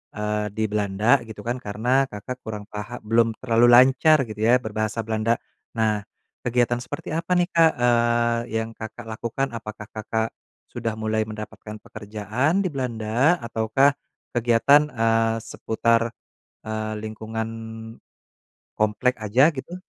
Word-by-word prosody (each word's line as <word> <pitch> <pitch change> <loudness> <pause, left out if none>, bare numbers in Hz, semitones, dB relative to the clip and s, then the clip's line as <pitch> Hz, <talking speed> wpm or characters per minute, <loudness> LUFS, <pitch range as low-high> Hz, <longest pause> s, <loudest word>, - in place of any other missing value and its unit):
eee, 105 0 -1
di 110 - -1
Belanda 105 +5 +2
gitu 110 -2 -9
kan 120 +4 -2
karena 120 +6 +1
Kakak 105 +5 -6
kurang 105 -2 -6
paha 105 +3 -7
belum 115 +1 +3
terlalu 120 -1 +4
lancar 135 +5 +6
gitu 105 0 -8
ya 125 +2 +6
berbahasa 110 0 -2
Belanda. 110 +1 +1 0.4
Nah 110 -2 +1 0.4
kegiatan 120 0 +2
seperti 145 +6 -7
apa 165 +3 -1
nih, 175 +1 +2
Kak, 165 -1 +5
eee, 120 -1 +3 0.2
yang 115 0 -6
Kakak 110 +2 -8
lakukan 115 +5 -2
apakah 110 -1 -8
Kakak 110 +1 -2 0.4
sudah 115 -1 -3
mulai 110 0 -1
mendapatkan 110 0 -8
pekerjaan 110 - -1
di 185 - 0
Belanda 125 +3 +1
ataukah 115 +5 +2 0.4
kegiatan, 120 +5 +4
eee, 115 0 +2
seputar, 115 +1 0 0.5
eee, 110 0 -3
lingkungan 110 +1 -5 1.3
komplek 110 +4 +1
aja 125 +9 +4
gitu? 145 +6 -7
115 Hz, 130 wpm, -24 LUFS, 110-125 Hz, 1.3 s, lancar